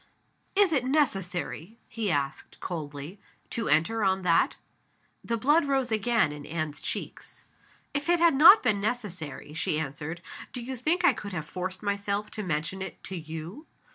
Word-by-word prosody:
"Is 390 -4 +4
it 270 -5 +2
necessary," 195 - -1
he 220 -2 -2
asked, 140 -4 -2
coldly, 155 +2 -6 0.3
"to 230 - -2
enter 165 +10 +2
on 190 -1 +2
that?" 170 -2 +3 0.7
The 230 - -1
blood 295 +7 +4
rose 270 -3 +1
again 220 -5 +2
in 150 0 -8
Anne's 155 -1 -4
cheeks. - - -6 0.5
"If 290 +3 -2
it 345 0 +4
had 335 -2 +5
not 325 +10 +9
been 210 -5 +2
necessary," 185 - -4
she 155 0 0
answered, 160 +3 -5 0.3
"do 245 - -4
you 260 +2 -4
think 310 +9 +1
I - - +6
could 210 -3 -7
have 155 -4 -3
forced 185 +2 -5
myself 200 0 -1
to 215 - -4
mention 175 +1 -2
it 190 - -7
to 190 - -6
_you? 160 - -8
200 Hz, 165 wpm, -28 LUFS, 160-245 Hz, 0.7 s, not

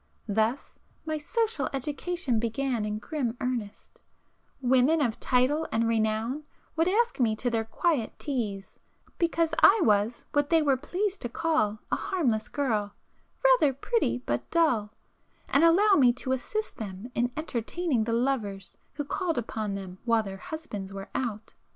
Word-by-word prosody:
Thus 220 +5 -1 0.3
my 310 -1 -2
'social 455 +8 -1
education' 285 -1 -1
began 235 0 -1
in 210 0 -2
grim 245 -1 -3
earnest;—women 255 +4 -2
of 240 -7 0
title 265 +5 +2
and 230 0 +1
renown 225 +5 0 0.3
would 325 +1 +2
ask 460 +2 +1
me 225 -3 +3
to 245 +2 -1
their 225 -1 0
'quiet 255 0 0
teas,' 215 -9 -4 0.4
because 330 -1 +1
I 425 +3 +7
was 210 +2 +2
what 290 -1 +1
they 325 -2 +4
were 280 -2 +3
pleased 380 +9 -2
to 240 - -2
call 310 -7 +1
a - - +3
'harmless 250 - -1
girl—' 215 -8 -1 0.5
'rather - - +5
pretty, 230 - 0
but 120 0 -2
dull,'—and 280 0 -1
allow 390 +5 +6
me 255 -9 +6
to 255 +1 -4
assist 430 - -2
[p - - -15
403] 220 - -3 0.2
them 245 - -9
in 245 +1 0
entertaining 280 -2 -1
the 230 - -1
lovers 230 -6 -1
who 290 - -3
called 340 +2 -1
upon 215 -3 -3
them 190 -1 -7
while 230 -2 +2
their 195 -2 -6
husbands 205 -8 -6
were 195 0 -7
out. 225 -4 -3
250 Hz, 150 wpm, -28 LUFS, 220-315 Hz, 0.5 s, I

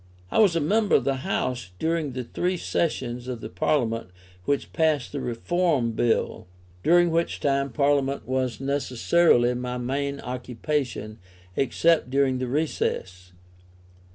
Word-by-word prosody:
I - - +2
was 200 -6 +5
a - - +3
member 205 +7 +2
of - - +3
the 135 -1 0
House 125 -4 -2
during 160 - -1
the 130 0 -3
three 180 +9 -1
sessions 125 -8 -2
of 125 -2 -4
the - - -7
Parliament 115 +3 0 0.4
which 140 - -1
passed 155 -5 +1
the 145 - -4
Reform 135 +1 0
Bill; 115 -4 0 0.3
during 175 - +4
which 165 +1 0
time 140 -1 0
Parliament 140 -1 +1
was 130 -1 -1
necessarily 135 -1 +2
my 125 0 -3
main 140 +3 -2
occupation, 125 -2 -3 0.4
except 160 +1 +2
during 135 -1 +2
the 130 - -2
recess. 95 - -2
135 Hz, 135 wpm, -25 LUFS, 125-155 Hz, 0.4 s, was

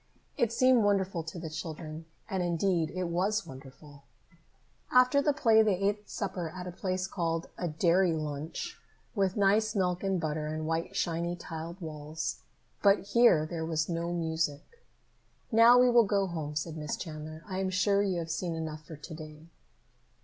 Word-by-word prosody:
It 235 -2 +1
seemed 255 -1 +4
wonderful 195 -3 +1
to 165 +2 -8
the 165 -1 -5
children, 155 0 -6 0.2
and, 190 -3 -2
indeed, 170 -1 +1
it 185 0 -3
was 185 +5 0
wonderful. 135 +2 -12 0.9
After 255 +3 +5
the 295 - +3
play 230 -7 +4
they 210 -3 +3
ate 205 +2 -1
supper 180 -3 -3
at 180 +2 -7
a 180 - -5
place 185 +1 -2
called 165 -3 -2
a 175 - -3
dairy 170 +3 +3
lunch, 155 0 -4 0.3
with 195 -1 0
nice 210 +2 +3
milk 180 -2 +1
and 195 -2 +1
butter 155 -1 -2
and 155 0 -3
white 165 +1 -2
shiny 170 0 -1
tiled 165 +1 -7
walls. 155 0 -4 0.4
But 200 0 +3
here 220 -9 +5
there 160 0 -4
was 160 0 -1
no 170 0 -2
music. 160 - -2 0.7
"Now 230 +2 +7
we 250 0 +6
will 235 -2 +6
go 200 -1 +2
home," 155 -5 -4
said 160 +1 -3
Miss 150 -1 -3
Chandler. 155 -1 -7
"I 190 -2 -3
am 190 -1 0
sure 200 +2 +2
you 195 -3 0
have 165 -1 -3
seen 170 0 -2
enough 155 -1 -5
for 160 - -10
to 150 +2 -10
day." 155 0 -10
170 Hz, 170 wpm, -30 LUFS, 160-195 Hz, 0.9 s, Now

